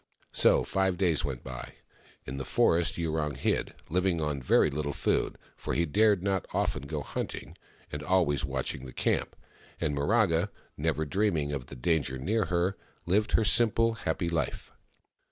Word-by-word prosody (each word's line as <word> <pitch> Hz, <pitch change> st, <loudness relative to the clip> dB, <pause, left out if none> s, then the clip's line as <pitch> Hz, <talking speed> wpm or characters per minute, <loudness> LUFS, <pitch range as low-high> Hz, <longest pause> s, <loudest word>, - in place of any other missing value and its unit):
So -, -, +4 dB
five 95 Hz, -2 st, 0 dB
days 85 Hz, -5 st, +2 dB
went 65 Hz, -4 st, -4 dB
by. 65 Hz, -1 st, -7 dB, 0.5 s
In 65 Hz, +2 st, -5 dB
the 70 Hz, -, -3 dB
forest 85 Hz, +6 st, +2 dB
Yurong 80 Hz, -3 st, -1 dB
hid, -, -, -1 dB, 0.2 s
L 90 Hz, +2 st, +3 dB
/ing 90 Hz, -3 st, +1 dB
on 75 Hz, -3 st, -1 dB
very 70 Hz, +3 st, +4 dB
Httle 70 Hz, 0 st, -2 dB
food -, -, 0 dB
— -, -, -30 dB
for -, -, -4 dB
he 85 Hz, -, +2 dB
dared 105 Hz, +3 st, +3 dB
not 95 Hz, -2 st, 0 dB
often 70 Hz, -, -1 dB
go 75 Hz, -1 st, -3 dB
hunting -, -, -5 dB, 0.2 s
— -, -, -29 dB
and 75 Hz, -, -4 dB
always 85 Hz, -7 st, +2 dB
watching 65 Hz, -1 st, -3 dB
the 65 Hz, -, -10 dB
camp; -, -, 0 dB, 0.4 s
and 75 Hz, -, 0 dB
Miraga, 85 Hz, +2 st, +2 dB, 0.3 s
never 80 Hz, +1 st, 0 dB
dreaming 80 Hz, -4 st, 0 dB
of 65 Hz, -4 st, -4 dB
the -, -, -9 dB
danger 70 Hz, 0 st, 0 dB
near 105 Hz, -, 0 dB
her, 90 Hz, +2 st, 0 dB, 0.3 s
lived 105 Hz, +5 st, +1 dB
her 110 Hz, -, +4 dB
simple, 115 Hz, 0 st, +4 dB
happy 95 Hz, -5 st, -2 dB
life. 85 Hz, -1 st, -2 dB
80 Hz, 170 wpm, -29 LUFS, 70-95 Hz, 0.5 s, So